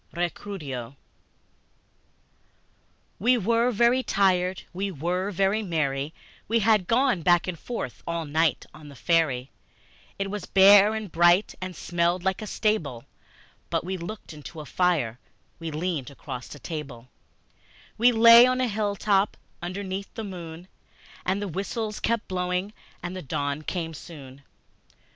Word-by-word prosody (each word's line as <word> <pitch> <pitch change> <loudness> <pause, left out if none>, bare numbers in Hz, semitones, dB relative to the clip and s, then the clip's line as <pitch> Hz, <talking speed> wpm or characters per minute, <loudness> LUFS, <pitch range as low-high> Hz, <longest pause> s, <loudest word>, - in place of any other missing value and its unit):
Recuerdo 155 - -4 2.2
WE 245 +5 +4
WERE 230 +3 +2
very 240 +2 +3
tired, 185 -4 +1
we 195 +3 -2
were 180 +4 -2
very 195 +2 +1
merry 150 -6 -1 0.4
We 230 - +2
had 210 -4 +3
gone 245 -5 +2
back 175 +2 +3
and 175 -3 -4
forth 230 - -5
all 170 -1 -2
night 155 +2 +1
on 150 -1 -12
the 140 - -12
ferry. 140 -5 +1 0.7
It 195 0 -3
was 205 -3 -5
bare 200 +2 +7
and 215 -4 -5
bright, 175 +4 +4
and 185 -1 -5
smelled 175 +2 0
like 190 +1 0
a 215 - -5
stable 165 - -1 0.6
But - - 0
we 185 +2 -3
looked 185 +1 -7
into 155 +2 -10
a 150 - -7
fire, 145 -9 0 0.4
we 165 -1 -4
leaned 155 -3 -3
across 135 -1 -8
a - - -12
table, 135 -5 -7 0.9
We 240 +2 +5
lay 230 +1 +9
on 255 0 +1
a 255 - +2
hilltop 205 -2 +1 0.2
underneath 190 +2 -5
the 225 - -4
moon; 175 -3 -8 0.6
And 190 +2 +1
the - - -3
whistles 210 +4 -3
kept 230 -1 -1
blowing, 180 +2 -2 0.3
and 175 +1 -4
the 185 - -5
dawn 145 0 -2
came 165 0 -4
soon. 140 -4 -11
180 Hz, 140 wpm, -26 LUFS, 160-205 Hz, 2.2 s, lay